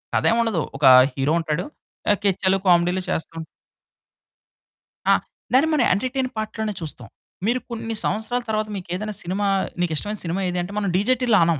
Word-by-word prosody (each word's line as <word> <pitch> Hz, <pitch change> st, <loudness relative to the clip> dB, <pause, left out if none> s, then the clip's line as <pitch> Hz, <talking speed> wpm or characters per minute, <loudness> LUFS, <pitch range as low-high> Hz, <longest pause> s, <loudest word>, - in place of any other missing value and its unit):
కథేం 230 Hz, -, +3 dB
ఉండదు, 205 Hz, -8 st, 0 dB, 0.2 s
ఒక 145 Hz, -, +1 dB, 0.3 s
హీరో 140 Hz, +3 st, 0 dB
ఉంటాడు, 160 Hz, +1 st, -2 dB, 0.5 s
ఆహ్, 205 Hz, -, +3 dB
కెచ్చలు, 190 Hz, 0 st, +2 dB
కామెడీలు 180 Hz, +1 st, +3 dB
చేస్తా 165 Hz, -1 st, -3 dB, 1.7 s
ఆ! -, -, +7 dB, 0.4 s
దాన్ని 280 Hz, +5 st, +5 dB
మనం 275 Hz, -5 st, +3 dB
ఎంటర్టైన్ 255 Hz, +5 st, -1 dB
పార్ట్ 215 Hz, 0 st, -4 dB
లోనే 215 Hz, -1 st, -1 dB
చూస్తాం. 135 Hz, -7 st, -5 dB, 0.4 s
మీరు 245 Hz, +3 st, +1 dB
కొన్ని 225 Hz, -1 st, -4 dB
సంవత్సరాల 220 Hz, +4 st, -1 dB
తర్వాత, 215 Hz, 0 st, 0 dB
మీకేదైనా 190 Hz, +3 st, -4 dB
సినిమా 195 Hz, +3 st, -1 dB, 0.3 s
నీకిష్టమైన 175 Hz, +5 st, -1 dB
సినిమా 170 Hz, +3 st, -2 dB
ఏది 180 Hz, 0 st, -2 dB
అంటే, 175 Hz, +3 st, -6 dB
మనం 200 Hz, -2 st, 0 dB
'డీజే 215 Hz, +7 st, +3 dB
టిల్లు' 235 Hz, -4 st, +4 dB
అనం. 165 Hz, -3 st, +1 dB
200 Hz, 155 wpm, -22 LUFS, 175-220 Hz, 1.7 s, ఆ